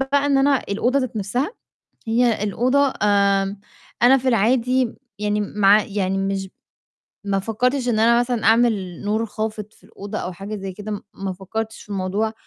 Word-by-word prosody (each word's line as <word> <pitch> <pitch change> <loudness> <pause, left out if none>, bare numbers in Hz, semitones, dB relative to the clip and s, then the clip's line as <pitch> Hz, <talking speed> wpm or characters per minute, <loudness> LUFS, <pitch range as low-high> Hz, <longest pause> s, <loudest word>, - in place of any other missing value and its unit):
بقى 280 +1 +1
إن 275 -1 +3
أنا 275 0 +4
الأوضة 245 +7 +1
ذات 255 -3 -3
نفْسها، 245 - -1 0.6
هي 230 -2 +2
الأوضة 255 +7 +2
آمم، 200 -1 +2 0.4
أنا 265 +2 +7
في 260 - -3
العادي 250 +2 +2 0.3
يعني 210 0 0
مع 205 0 +4
يعني 195 -1 -2
مش 195 0 -2 0.8
ما 200 -1 0
فكّرتش 250 +6 0
إن 220 -3 +1
أنا 235 +1 +5
مثلًا 245 -2 -1
أعمل 220 -6 +2
نور 220 +2 0
خافت 215 0 -5
في 185 - -25
الأوضة 205 0 -7
أو 180 - -4
حاجة 200 +4 -6
زي 195 -1 -6
كده، 205 +1 -6
ما 195 -1 -4
فكّرتش 220 +4 -5
في - - -19
الموضوع، 200 +2 -1
215 Hz, 165 wpm, -21 LUFS, 195-245 Hz, 0.8 s, أنا